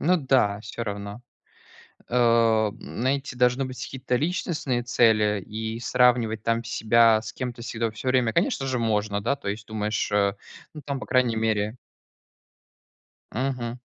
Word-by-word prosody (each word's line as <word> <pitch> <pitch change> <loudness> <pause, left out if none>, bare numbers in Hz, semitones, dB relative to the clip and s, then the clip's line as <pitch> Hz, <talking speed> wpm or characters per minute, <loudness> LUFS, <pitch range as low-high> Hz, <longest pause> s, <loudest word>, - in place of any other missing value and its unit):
Ну 180 +3 +3
да, 125 -8 +2
всё 115 - -6
равно. 100 +2 -6 0.9
Э, 115 -3 +3
знаете, 135 +2 -2
должны 125 +2 +2
быть 130 0 -7
какие-то 130 -1 -2
личностные 150 -5 -1
цели, 105 -4 +3
и 110 +2 -5
сравнивать 120 -3 +2
там 115 0 0
себя 115 0 +4
с - - -7
кем-то 125 -2 -5
всегда, 115 -1 -2
всё 110 +4 -5
время, 125 -3 +2
конечно, 135 - 0
же 130 -2 -1
можно, 105 -2 0
да, 140 +7 0
то 140 - -7
есть 105 +1 -4
думаешь, 105 -1 -2
э, 100 0 +2 0.4
ну, 150 - -9
там 140 0 -4
по - - -7
крайней 125 -3 +2
мере 110 0 0 1.6
Мгм. 125 -2 -2
115 Hz, 145 wpm, -25 LUFS, 110-130 Hz, 1.6 s, себя